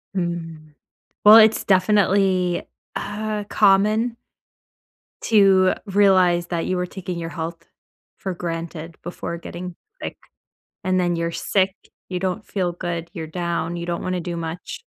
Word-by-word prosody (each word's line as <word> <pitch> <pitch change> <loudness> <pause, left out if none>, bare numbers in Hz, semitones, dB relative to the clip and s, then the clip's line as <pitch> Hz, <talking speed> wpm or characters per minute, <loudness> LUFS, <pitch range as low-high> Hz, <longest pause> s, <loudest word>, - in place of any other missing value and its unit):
Mm, 165 -4 -4 0.5
well, 210 +1 +10
it's 220 0 +6
definitely, 190 -2 +2 0.3
uh, 210 0 -3
common... 215 +4 +3 1.1
to 195 -4 +5
realize 185 -4 +4
that 170 -2 -2
you 185 - -1
were 180 0 -1
taking 180 -2 -6
your 165 -1 -4
health 165 0 -6 0.5
for 190 - -4
granted 165 -1 -5
before 170 0 -5
getting 175 +1 -7 0.3
sick. - - -5 0.7
And 185 -1 +1
then 175 -1 +1
you're 170 0 -1
sick, 190 +3 +1 0.4
you 180 - -2
don't 190 +3 -2
feel 180 -3 -2
good. 170 -1 -4
You're 160 -1 -6
down, 170 0 -2
you 170 0 -5
don't 170 0 -3
wanna 185 -1 -2
do 175 0 -4
much. 165 +1 -6
180 Hz, 135 wpm, -22 LUFS, 170-195 Hz, 1.1 s, well